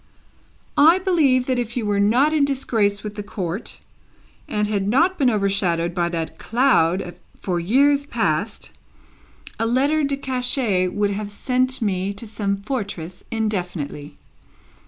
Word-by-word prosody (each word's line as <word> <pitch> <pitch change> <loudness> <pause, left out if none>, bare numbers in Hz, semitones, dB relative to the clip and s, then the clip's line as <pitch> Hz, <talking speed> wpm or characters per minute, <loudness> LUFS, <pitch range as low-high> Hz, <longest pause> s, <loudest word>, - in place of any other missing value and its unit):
"I 325 +5 +7
believe 310 -9 +2
that 255 -1 0
if 235 0 -3
you 230 - -1
were 205 -1 +1
not 245 +9 +3
in 305 -2 +3
disgrace 225 -7 0
with 210 -1 -5
the 210 - -5
Court, 195 0 -4 0.7
and 210 0 -1
had 200 -2 -1
not 335 - +3
been 265 -3 +4
overshadowed 195 -5 0
by 170 -1 0
that 165 -2 -4
cloud 190 -8 +2 0.3
for 180 -2 -2
years 280 +10 +3
past, - - -2 0.9
a 225 - +1
letter 280 +6 +2
de 280 -1 0
cachet 250 -8 0
would 205 +2 0
have 205 +1 -4
sent 255 +4 0
me 195 -1 -1
to 200 +3 -8
some 205 -2 -2
fortress 200 - -5
indefinitely." 180 - -3
210 Hz, 140 wpm, -22 LUFS, 195-260 Hz, 0.9 s, I